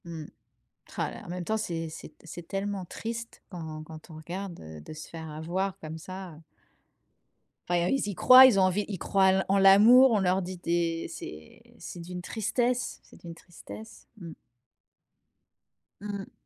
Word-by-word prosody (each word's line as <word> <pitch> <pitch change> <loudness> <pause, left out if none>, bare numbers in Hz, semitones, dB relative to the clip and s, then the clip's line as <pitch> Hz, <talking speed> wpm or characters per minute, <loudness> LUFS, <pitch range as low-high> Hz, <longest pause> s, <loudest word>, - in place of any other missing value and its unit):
Mmh. 165 -2 -7 0.7
Rah - - -1
là - - -10
là! - - -12
En - - -12
même 180 0 -4
temps, 220 +5 0
c'est 165 -6 -3
c'est 155 - -9
t - - -20
c'est 170 +1 -9
tellement 195 -1 -3
triste 230 +5 -7
quand 160 -4 -7
quand 155 0 -12
on 155 - -10
regarde, 175 +3 -6
heu, 80 -1 -10
de 75 - -10
se 155 0 -9
faire 160 -1 -8
avoir 180 +5 -3
comme 160 0 -7
ça, 185 +2 -8
heu. 150 - -15 1.3
Enfin, 175 -1 +2
eux, - - 0
ils 270 -6 0
y 205 - -4
croient. 255 +6 +9
Ils 235 -7 +5
ont - - +5
envie 185 +2 +1
ils 200 - -4
croient 195 +3 +2
en - - +6
l'a 190 0 +1
en 195 - +4
l'amour, 215 +7 +7
on 215 - +3
leur 190 0 +2
dit 185 0 -6
des 170 -1 -1
c'est 80 - -10 0.2
c'est - - -8
d'une 180 +1 -7
tristesse! 240 +6 -1
C'est - - -18
d'une 170 -1 -9
tristesse. 185 +6 -12
Mmh. 170 -5 -9 1.7
Mmh. 200 -1 -6
180 Hz, 190 wpm, -28 LUFS, 165-200 Hz, 1.7 s, croient